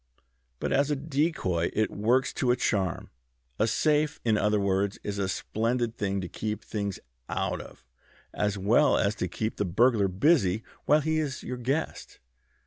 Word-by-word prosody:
But -, -, -1 dB
as 140 Hz, +1 st, +2 dB
a 150 Hz, -, +1 dB
decoy 140 Hz, -, 0 dB
it 110 Hz, 0 st, +1 dB
works 120 Hz, +5 st, +1 dB
to 125 Hz, -, 0 dB
a 125 Hz, -, +5 dB
charm. 95 Hz, -7 st, -1 dB, 0.5 s
A 110 Hz, -, +3 dB
safe, 150 Hz, +5 st, +1 dB
in 110 Hz, -2 st, +3 dB
other 105 Hz, 0 st, +2 dB
words, 100 Hz, 0 st, 0 dB
is 100 Hz, -1 st, -3 dB
a 95 Hz, -1 st, 0 dB
splendid 115 Hz, +4 st, -1 dB
thing 100 Hz, -2 st, -1 dB
to 90 Hz, -, -4 dB
keep 105 Hz, +3 st, -4 dB
things 100 Hz, -3 st, -3 dB, 0.3 s
out -, -, -1 dB
of, -, -, -14 dB, 0.5 s
as 105 Hz, -1 st, -1 dB
well 110 Hz, +10 st, +4 dB
as 100 Hz, +1 st, +2 dB
to -, -, -1 dB
keep 110 Hz, 0 st, -3 dB
the -, -, +1 dB
burglar 105 Hz, +3 st, +3 dB
busy 105 Hz, -, +2 dB, 0.2 s
while 150 Hz, +2 st, +4 dB
he 160 Hz, +1 st, 0 dB
is 145 Hz, -4 st, -3 dB
your 125 Hz, -, -4 dB
guest. 135 Hz, +6 st, -3 dB
110 Hz, 170 wpm, -28 LUFS, 100-135 Hz, 0.5 s, a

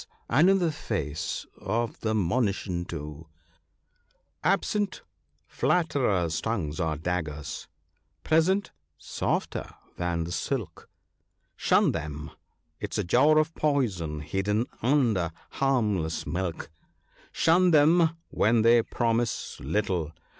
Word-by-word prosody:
— -, -, -39 dB
and 150 Hz, +10 st, +5 dB
in 195 Hz, -, +5 dB
the 175 Hz, -4 st, +1 dB
face 80 Hz, -, -3 dB
of 115 Hz, +1 st, -2 dB
the 110 Hz, -1 st, -1 dB
monition 95 Hz, -3 st, 0 dB
too, 75 Hz, -1 st, -7 dB, 0.6 s
— -, -, -44 dB
"Absent, 205 Hz, -2 st, -2 dB, 0.4 s
flatterers' 115 Hz, -, +1 dB
tongues 95 Hz, -9 st, -2 dB
are 80 Hz, -3 st, 0 dB
daggers 80 Hz, -3 st, -4 dB, 0.3 s
— 75 Hz, 0 st, -46 dB
present, 185 Hz, +6 st, +3 dB, 0.3 s
softer -, -, -3 dB, 0.2 s
than 85 Hz, -1 st, -1 dB
the 85 Hz, -, -6 dB
silk; 105 Hz, -4 st, -4 dB, 0.7 s
Shun -, -, +3 dB
them! 75 Hz, +1 st, -5 dB, 0.5 s
'tis -, -, -3 dB
a 105 Hz, -, +1 dB
jar 150 Hz, -, +4 dB
of 155 Hz, +1 st, +2 dB
poison 100 Hz, -, 0 dB
hidden 105 Hz, +8 st, 0 dB, 0.2 s
under 115 Hz, -, +2 dB, 0.2 s
harmless 105 Hz, -12 st, 0 dB
milk; 90 Hz, -3 st, -3 dB, 0.6 s
Shun 180 Hz, +3 st, +4 dB
them 165 Hz, +1 st, +4 dB
when 110 Hz, +1 st, +3 dB
they 115 Hz, +1 st, +6 dB
promise 115 Hz, 0 st, -1 dB
little 85 Hz, 0 st, -1 dB
105 Hz, 110 wpm, -27 LUFS, 85-140 Hz, 0.7 s, they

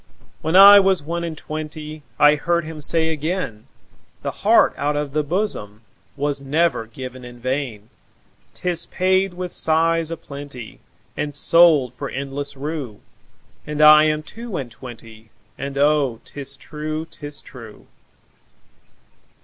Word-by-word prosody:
When 160 Hz, +3 st, -1 dB
I 200 Hz, +1 st, +10 dB
was 190 Hz, -5 st, +2 dB
one 170 Hz, +3 st, -3 dB
and 165 Hz, -2 st, -5 dB
twentyI 155 Hz, -1 st, -1 dB
heard 170 Hz, +2 st, 0 dB
him 155 Hz, -1 st, -8 dB
say 160 Hz, +2 st, +1 dB
again,'The 155 Hz, -, -6 dB
heart -, -, +4 dB
out 145 Hz, +1 st, -1 dB
of 145 Hz, -2 st, -3 dB
the 150 Hz, 0 st, +1 dB
bosomWas 145 Hz, -, -4 dB
never 145 Hz, -3 st, 0 dB
given 130 Hz, +2 st, -9 dB
in 120 Hz, 0 st, -10 dB
vain;'Tis 130 Hz, -, -5 dB
paid 185 Hz, 0 st, +1 dB
with 180 Hz, 0 st, -5 dB
sighs 165 Hz, 0 st, +1 dB
a 165 Hz, -, -4 dB
plentyAnd 140 Hz, 0 st, -9 dB
sold 155 Hz, -6 st, +5 dB
for 125 Hz, -, -6 dB
endless 140 Hz, +1 st, -5 dB
rue.'And 145 Hz, +1 st, -8 dB
I 150 Hz, 0 st, +8 dB
am 155 Hz, 0 st, 0 dB
two 225 Hz, +4 st, -7 dB
and 125 Hz, -4 st, -5 dB
twenty, 115 Hz, -3 st, -12 dB, 0.3 s
And 140 Hz, 0 st, -6 dB
oh, 140 Hz, -5 st, +2 dB
'tis 140 Hz, -1 st, -8 dB
true, 155 Hz, +2 st, -5 dB
'tis 145 Hz, -3 st, -8 dB
true. 115 Hz, -5 st, -13 dB
150 Hz, 120 wpm, -21 LUFS, 135-165 Hz, 0.3 s, I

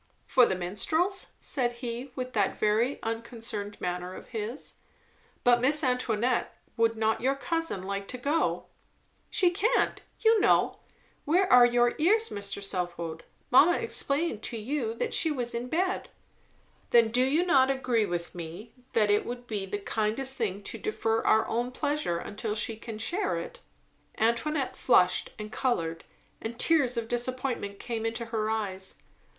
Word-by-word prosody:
"For 255 Hz, -3 st, +5 dB
the 190 Hz, -, 0 dB
Minstrels?" 315 Hz, -, 0 dB
said 245 Hz, -3 st, -1 dB
he, 240 Hz, +2 st, -6 dB
with 255 Hz, 0 st, -4 dB
that 205 Hz, -3 st, +1 dB
very 220 Hz, +6 st, +2 dB
unconcerned 225 Hz, -2 st, -4 dB
manner 180 Hz, +1 st, -3 dB
of -, -, -11 dB
his. 225 Hz, +4 st, -5 dB, 0.7 s
"But, 240 Hz, -1 st, +5 dB
Miss 295 Hz, +4 st, +3 dB
Antoinette, 250 Hz, -2 st, 0 dB, 0.2 s
would 230 Hz, -1 st, +2 dB
not 220 Hz, 0 st, +1 dB
your 265 Hz, +3 st, +2 dB
cousin 330 Hz, -, -1 dB
like 200 Hz, +1 st, -4 dB
to 255 Hz, -, -5 dB
go?" 290 Hz, +6 st, 0 dB, 0.6 s
"She 360 Hz, -2 st, +3 dB
can't, 435 Hz, +8 st, +1 dB, 0.2 s
you 450 Hz, -1 st, +5 dB
know. -, -, +3 dB, 0.4 s
Where 355 Hz, +6 st, +3 dB
are 245 Hz, -1 st, +9 dB
your 240 Hz, 0 st, +3 dB
ears, 435 Hz, +8 st, +3 dB
Mr. 200 Hz, 0 st, -4 dB
Southwode? 175 Hz, -4 st, -4 dB, 0.3 s
Mamma 315 Hz, +8 st, +6 dB
explained 295 Hz, -, 0 dB
to 235 Hz, -, -4 dB
you 230 Hz, 0 st, -2 dB
that -, -, -2 dB
she 325 Hz, -, +2 dB
was 250 Hz, -5 st, -2 dB
in 235 Hz, +1 st, -3 dB
bed." 365 Hz, +7 st, -1 dB, 0.8 s
"Then 230 Hz, -2 st, +5 dB
do 250 Hz, +3 st, +3 dB
you 300 Hz, +7 st, +2 dB
not 265 Hz, -7 st, +4 dB
agree 250 Hz, -5 st, +1 dB
with 175 Hz, -1 st, -4 dB
me, 175 Hz, +6 st, -8 dB, 0.2 s
that 210 Hz, -2 st, +3 dB
it 205 Hz, -, +3 dB
would 245 Hz, 0 st, -6 dB
be 205 Hz, -4 st, -4 dB
the 205 Hz, -, -2 dB
kindest 220 Hz, +6 st, -1 dB
thing 205 Hz, -5 st, -2 dB
to -, -, -6 dB
defer 225 Hz, -, 0 dB
our 220 Hz, -, +3 dB
own 240 Hz, +2 st, -1 dB
pleasure 290 Hz, -, -1 dB
until 210 Hz, +4 st, -4 dB
she 225 Hz, +1 st, +1 dB
can 225 Hz, 0 st, -8 dB
share 360 Hz, -, -1 dB
it?" -, -, -7 dB, 0.6 s
Antoinette 250 Hz, +5 st, 0 dB
flushed 180 Hz, -7 st, +3 dB
and 215 Hz, 0 st, -7 dB
coloured, 165 Hz, -12 st, -1 dB, 0.4 s
and 230 Hz, +1 st, -5 dB
tears 265 Hz, -5 st, +2 dB
of 230 Hz, -1 st, -2 dB
disappointment 245 Hz, -4 st, -2 dB
came 230 Hz, 0 st, -4 dB
into 225 Hz, +1 st, -2 dB
her 220 Hz, -2 st, -2 dB
eyes. 195 Hz, -4 st, -3 dB
235 Hz, 155 wpm, -28 LUFS, 210-270 Hz, 0.8 s, are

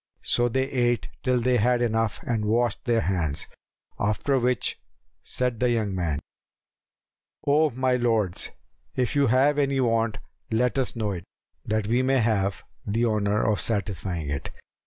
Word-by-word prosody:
So 120 Hz, 0 st, +2 dB
they 130 Hz, +3 st, +1 dB
ate 120 Hz, -7 st, 0 dB
till 125 Hz, -2 st, +2 dB
they 125 Hz, +1 st, +2 dB
had 120 Hz, +2 st, +3 dB
enough 115 Hz, -2 st, 0 dB
and 115 Hz, -3 st, -1 dB
washed 115 Hz, +2 st, +1 dB
their 120 Hz, -2 st, +2 dB
hands, 85 Hz, -7 st, 0 dB, 0.5 s
after 110 Hz, +6 st, +1 dB
which 125 Hz, -2 st, 0 dB, 0.4 s
said 125 Hz, -3 st, -1 dB
the 125 Hz, -, +2 dB
young 110 Hz, -4 st, 0 dB
man, 85 Hz, -6 st, -1 dB, 1.3 s
"O 150 Hz, +2 st, +4 dB
my 130 Hz, 0 st, +1 dB
lords, 115 Hz, -7 st, 0 dB, 0.5 s
if 125 Hz, 0 st, 0 dB
you 140 Hz, -1 st, +4 dB
have 135 Hz, +5 st, +3 dB
any 140 Hz, -1 st, +1 dB
want, 115 Hz, -3 st, +1 dB, 0.3 s
let 125 Hz, +4 st, +1 dB
us 130 Hz, -, -1 dB
know 110 Hz, -3 st, -1 dB
it, 90 Hz, -2 st, -6 dB, 0.4 s
that 110 Hz, -1 st, 0 dB
we 120 Hz, +4 st, +2 dB
may 135 Hz, +1 st, +2 dB
have 100 Hz, -5 st, +1 dB, 0.2 s
the 115 Hz, +3 st, 0 dB
honour 105 Hz, -2 st, +1 dB
of 105 Hz, -2 st, +2 dB
satisfying 95 Hz, -6 st, -1 dB
it." 70 Hz, -, -3 dB
115 Hz, 155 wpm, -26 LUFS, 105-125 Hz, 1.3 s, O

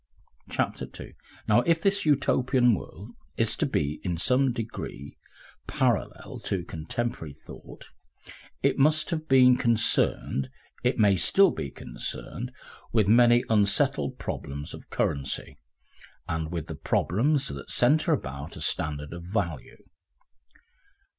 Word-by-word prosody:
Section -, -, -2 dB
2 -, -, -10 dB, 0.3 s
Now 110 Hz, +3 st, +5 dB
if 165 Hz, +4 st, +2 dB
this 195 Hz, -1 st, +1 dB
Utopian 130 Hz, -3 st, +3 dB
world 100 Hz, -, -7 dB, 0.3 s
is -, -, +1 dB
to -, -, +1 dB
be 75 Hz, +2 st, -2 dB
in 90 Hz, -2 st, -2 dB
some 125 Hz, +8 st, +3 dB
degree 115 Hz, -, -6 dB, 0.5 s
parallel -, -, -1 dB
to 95 Hz, -3 st, -1 dB
contemporary 85 Hz, -, -4 dB
thought, 80 Hz, -, -13 dB, 0.7 s
it -, -, +2 dB
must 155 Hz, +4 st, +3 dB
have 155 Hz, -1 st, -3 dB
been 125 Hz, -1 st, +6 dB
concerned, 110 Hz, -, +2 dB, 0.3 s
it -, -, +1 dB
may 105 Hz, -2 st, +5 dB
be 95 Hz, -, +2 dB
still 195 Hz, -, +4 dB
concerned, 70 Hz, -4 st, -5 dB, 0.4 s
with 110 Hz, -4 st, +2 dB
many 120 Hz, +2 st, +5 dB
unsettled 125 Hz, +5 st, +1 dB
problems 70 Hz, -, -5 dB
of -, -, -11 dB
currency, 70 Hz, -1 st, -2 dB, 0.7 s
and 80 Hz, 0 st, -3 dB
with 85 Hz, -3 st, -3 dB
the -, -, -6 dB
problems 135 Hz, -, 0 dB
that 70 Hz, 0 st, -8 dB
centre 155 Hz, +7 st, +3 dB
about 70 Hz, -, -3 dB
a -, -, -7 dB
standard 75 Hz, 0 st, -2 dB
of 85 Hz, -, -7 dB
value. 90 Hz, -, -4 dB
110 Hz, 125 wpm, -27 LUFS, 80-130 Hz, 0.7 s, been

